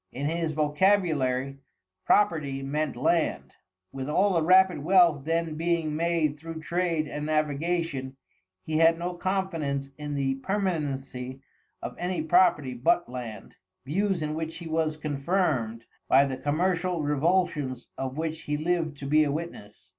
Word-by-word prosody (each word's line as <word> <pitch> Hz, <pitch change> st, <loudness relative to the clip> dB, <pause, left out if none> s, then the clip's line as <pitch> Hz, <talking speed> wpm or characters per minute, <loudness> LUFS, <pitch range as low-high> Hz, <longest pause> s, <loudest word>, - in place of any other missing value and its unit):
In 140 Hz, +3 st, -4 dB
his 165 Hz, +1 st, -1 dB
vocabulary, 150 Hz, -5 st, +1 dB, 0.5 s
property 150 Hz, -9 st, +2 dB
meant 150 Hz, 0 st, -2 dB
land. 125 Hz, -, 0 dB, 0.4 s
With 135 Hz, +1 st, -5 dB
all 195 Hz, +6 st, +3 dB
the 165 Hz, -, +2 dB
rapid 185 Hz, +2 st, +5 dB
wealth 170 Hz, -5 st, +4 dB
then 165 Hz, 0 st, 0 dB
being 165 Hz, -1 st, 0 dB
made 160 Hz, -2 st, 0 dB
through 165 Hz, 0 st, -7 dB
trade 170 Hz, -2 st, 0 dB
and 150 Hz, +1 st, -4 dB
navigation, 155 Hz, -2 st, -1 dB, 0.5 s
he 155 Hz, 0 st, -1 dB
had 165 Hz, +1 st, +5 dB
no 175 Hz, +1 st, -3 dB
confidence 165 Hz, -7 st, -2 dB
in 150 Hz, -1 st, -4 dB
the 135 Hz, -1 st, 0 dB
permanency 140 Hz, -9 st, -3 dB, 0.4 s
of -, -, -5 dB
any 180 Hz, -2 st, -1 dB
property 155 Hz, -5 st, +3 dB
but 125 Hz, +8 st, +2 dB
land, 120 Hz, -5 st, -7 dB, 0.3 s
views 185 Hz, +3 st, 0 dB
in 150 Hz, 0 st, -2 dB
which 160 Hz, +1 st, -4 dB
he 170 Hz, -, -8 dB
was 160 Hz, -1 st, 0 dB
confirmed 140 Hz, -, -1 dB, 0.2 s
by 135 Hz, +2 st, +6 dB
the 135 Hz, -1 st, -3 dB
commercial 170 Hz, +4 st, 0 dB
revulsions 150 Hz, -2 st, 0 dB
of 135 Hz, +1 st, -4 dB
which 160 Hz, 0 st, -3 dB
he 150 Hz, 0 st, -2 dB
lived 160 Hz, -2 st, -1 dB
to 140 Hz, -, -7 dB
be 155 Hz, +2 st, +4 dB
a 145 Hz, -, 0 dB
witness. 125 Hz, -, -7 dB
155 Hz, 145 wpm, -27 LUFS, 140-170 Hz, 0.5 s, by